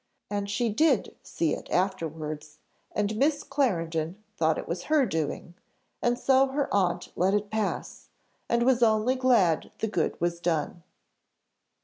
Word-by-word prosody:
And 200 -1 -2
she 225 +3 0
did 270 +2 +2
see 160 -3 -1
it - - -6
afterwards, 155 -5 -2 0.3
and 210 +1 -1
Miss 290 +3 +2
Clarendon 170 - -1 0.2
thought 160 -3 +2
it - - -5
was 175 +1 -4
her 305 -3 +3
doing, 165 -2 -3 0.5
and 240 0 +1
so 265 +1 +4
her 275 +1 -2
aunt 180 -3 0
let 190 +3 +2
it 205 0 -2
pass, 220 -1 -3 0.4
and 235 0 +2
was 250 -1 +3
only 220 +2 +3
glad 240 -11 +3
the 220 - -1
good 175 -7 -1
was 170 0 -1
done. 170 0 -1
205 Hz, 145 wpm, -27 LUFS, 170-245 Hz, 0.5 s, so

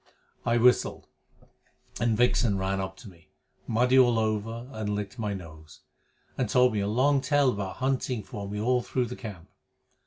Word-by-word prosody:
I 120 0 +3
whistled, 125 +1 +3 0.9
and 115 -2 +1
Vixen 120 -3 +2
ran 95 0 -1
up 95 0 -6
to 110 - -12
me, 85 -4 -17 0.4
muddy 125 +3 +3
all 120 -2 +5
over, 110 +2 -2
and 105 -4 -3
licked 105 +4 -5
my 105 -2 -2
nose, 80 -4 -12 0.6
and 125 -5 0
told 125 0 +4
me 105 - 0
a 100 - -1
long 135 +6 +2
tale 140 0 +3
about 100 -4 -4
hunting 130 -3 -1
for 100 -3 -7
me 105 +1 -4
all 125 +3 +2
through 125 +1 -1
the 125 +1 -6
camp. 100 -8 -9
110 Hz, 175 wpm, -27 LUFS, 100-125 Hz, 0.9 s, all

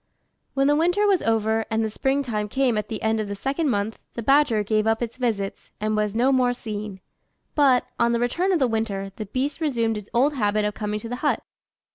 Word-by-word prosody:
When 275 0 +3
the 290 +1 +4
winter 355 +7 +2
was 390 -4 +3
over, 225 0 +1
and 220 0 +1
the - - -2
spring 270 +5 0
time 210 -5 -2
came 265 -1 +1
at 210 - -2
the 220 - -5
end 220 0 +1
of 215 - -2
the 200 - -4
second 275 +8 -1
month, 210 -1 -1 0.2
the 235 - -4
Badger 270 -5 +4
gave 215 +1 +1
up 225 0 +2
its 235 +1 -5
visits, 220 -6 -2
and 215 0 0
was 210 0 0
no 250 +4 +3
more 250 -2 +3
seen; 210 -4 -6 0.5
but, 270 -4 +4
on 235 0 +3
the 235 - +1
return 335 +11 +1
of 365 - +3
the 265 -5 +2
winter, 210 -4 -2
the 215 - -5
beast 275 - -2
resumed 230 -7 0
its 210 - -14
old 270 +5 +3
habit 210 -4 +1
of 210 - -1
coming 210 0 -3
to 230 - -7
the 245 - -3
hut. 295 +3 0
225 Hz, 230 wpm, -24 LUFS, 215-270 Hz, 0.5 s, the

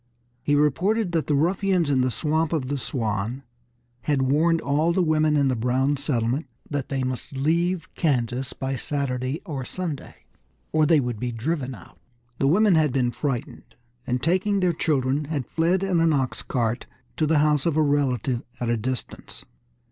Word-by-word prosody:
He 145 +3 +1
reported 180 +8 +2
that 165 -2 0
the 150 - +2
ruffians 180 +1 +2
in 130 -2 +3
the 130 - +2
Swamp 155 +5 0
of 135 -5 -1
the 145 - -1
Swan 115 0 -2 0.6
had 145 -3 +1
warned 160 +5 +3
all 150 +4 +1
the 180 +1 +2
women 155 -2 +2
in 140 -1 +3
the 130 - +1
Brown 130 +5 +1
settlement 135 0 -1 0.2
that 145 -3 -3
they 135 -2 -1
must 130 +1 -4
leave 170 +5 +1
Kansas 130 -4 0
by 135 0 -3
Saturday 130 +1 -2
or 145 -7 -4
Sunday, 160 +1 -6 0.5
or 155 -1 +3
they 160 -1 +5
would 120 -5 -3
be 125 +1 -2
driven 130 +2 -2
out. 90 - -16 0.4
The 135 - +2
women 200 +6 +4
had 155 -3 +3
been 125 -2 +1
frightened, 125 0 -4 0.3
and 125 0 -1
taking 190 +4 +2
their 180 -2 +2
children, 145 -2 0
had 145 -4 -3
fled 175 +7 +1
in 185 -3 +1
an 165 -1 +3
ox 135 -3 -1
cart 120 -1 -2 0.3
to 155 - +2
the 160 0 +3
house 150 0 +3
of 160 -2 +1
a 155 - +4
relative 135 -3 +1 0.2
at 120 - -2
a 120 - +2
distance. 125 +3 -5
145 Hz, 180 wpm, -24 LUFS, 130-160 Hz, 0.6 s, they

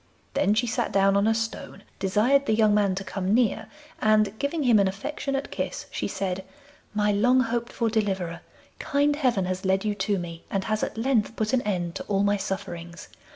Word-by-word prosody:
Then 200 +2 +2
she 240 +3 +2
sat 240 +1 -1
down 195 0 +3
on 200 +2 +3
a 225 - +3
stone, 225 -2 -4 0.2
desired 230 +9 +2
the 220 - +3
young 215 -1 +4
man 200 -2 +2
to 195 - -4
come 195 +1 -1
near, 220 -2 +1 0.3
and, 215 -2 +3
giving 290 +2 -1
him 235 -5 +5
an 200 - +4
affectionate 275 +7 -3
kiss, - - -4
she - - -2
said, 190 -1 -3 0.5
'My 210 0 +2
long 245 +6 +4
hoped 235 0 -2
for 230 - -1
deliverer, 190 -6 -1 0.4
kind 285 +1 +1
heaven 250 -10 +1
has 185 +1 -3
led 190 +2 +1
you 210 - +1
to 205 0 -1
me, 170 -2 -7
and 195 -1 -1
has 215 +2 -1
at - - -3
length 230 -2 +1
put 215 +1 -1
an 255 - +3
end 180 -6 -2
to - - -6
all 200 -1 +1
my 205 0 +2
sufferings. 180 -3 -6
210 Hz, 200 wpm, -26 LUFS, 195-235 Hz, 0.5 s, him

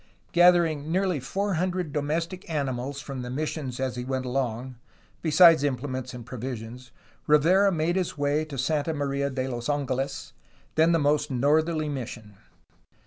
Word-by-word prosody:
Gathering 170 -4 +4
nearly 185 -3 +1
four 195 +10 -2
hundred 180 -2 -1
domestic 165 +5 -2
animals 140 -2 -2
from 135 -3 -6
the 125 - -6
missions 135 -2 -3
as 130 -1 -2
he 125 - -3
went 130 0 -3
along, 125 -1 -3 0.4
besides 165 -1 +6
implements 130 -2 -2
and 120 -2 -9
provisions, 125 -1 -7 0.4
Rivera 175 +7 +5
made 170 +1 0
his 180 -4 -2
way 145 +2 +1
to 145 -3 -8
Santa 150 +4 0
Maria 140 -1 -1
de 130 -1 -3
los 120 0 -4
Angeles, 135 -1 -2 0.4
then 160 +2 +4
the 165 - +4
most 145 -1 +1
northerly 155 +4 +1
mission. 120 -6 -6
145 Hz, 145 wpm, -26 LUFS, 130-160 Hz, 0.4 s, besides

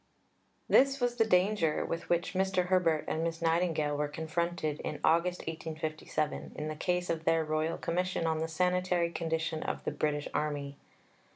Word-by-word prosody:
This 275 +1 +5
was 245 -1 0
the 225 -2 +3
danger 180 -4 +2
with 165 0 -4
which 175 +2 +1
Mr. 190 -1 +1
Herbert 170 -4 +2
and 160 - -1
Miss 165 0 -2
Nightingale 165 -3 +1
were 150 0 0
confronted 160 0 -2
in - - -4
August 170 +2 +3
1857 155 -1 -3
in 150 +1 -4
the 155 - -4
case 180 +2 0
of 165 -1 -3
their 165 -1 +2
Royal 155 +1 0
Commission 180 0 -1
on 160 -1 +1
the 160 - -1
sanitary 180 0 +1
condition 160 -1 -2
of - - -3
the - - -1
British 150 -1 -1
Army. 145 -2 -2
165 Hz, 165 wpm, -31 LUFS, 155-180 Hz, -, This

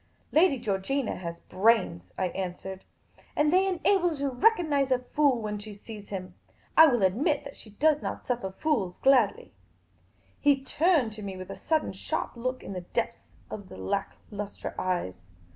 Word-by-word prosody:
" - - -38
Lady 315 -2 +5
Georgina 230 +4 -1
has 170 -1 -6
brains," 185 - +1
I 185 -1 0
answered; 190 +1 -5 0.2
" - - -29
and 300 +2 +3
they 380 +1 +4
enable 370 0 +2
her 325 - -3
to 280 -1 -1
recognise 300 - +3
a 255 - +4
fool 260 0 +1
when 210 -1 -3
she 210 0 -9
sees 210 0 -10
him. 185 -2 -6 0.4
I 320 - +10
will 240 -8 +2
admit 245 +10 +2
that 280 - -9
she 220 - -12
does 300 +8 +2
not - - -5
suffer 240 -6 -1
fools 195 - -1
gladly." 255 -6 +3 0.9
He 280 -2 +3
turned 290 - +2
to 215 - -8
me 195 -2 -5
with 185 0 -7
a - - -6
sudden 315 -1 0
sharp - - -3
look 255 +2 -3
in - - -6
the 180 - -4
depths 175 - -3 0.2
of 200 -3 -7
the - - -10
lack 95 - -2 0.2
lustre 205 -1 -5
eyes. 95 - -2
230 Hz, 180 wpm, -28 LUFS, 190-285 Hz, 0.9 s, I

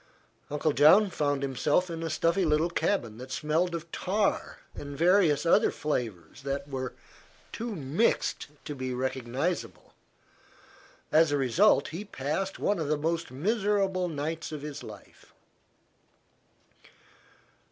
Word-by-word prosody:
Uncle 150 +1 0
John 190 +7 +6
found 145 -3 0
himself 140 +6 +1
in 165 -2 -5
a 165 - -2
stuffy 165 +4 +1
little 160 +1 +2
cabin 120 - -1
that 130 +1 -9
smelled 160 +5 0
of 165 0 -7
tar 200 +2 -1 0.2
and 145 -1 -7
various 170 -3 +4
other 200 +6 +5
flavors 120 - -4
that 140 +1 -3
were 130 -2 -4 0.6
too 230 -1 -4
mixed 155 - 0 0.2
to 150 - -4
be 130 -2 -4
recognizable. 130 +6 -3 1.2
As 160 -1 +5
a 145 - +2
result 140 - +3
he 170 +6 -5
passed 190 +2 -3
one 205 -3 0
of 155 - -2
the 150 0 +1
most 165 +2 -1
miserable 195 - 0
nights 160 +1 -4
of 150 -2 -6
his 150 -2 -6
life. - - -13
155 Hz, 130 wpm, -28 LUFS, 140-180 Hz, 1.2 s, John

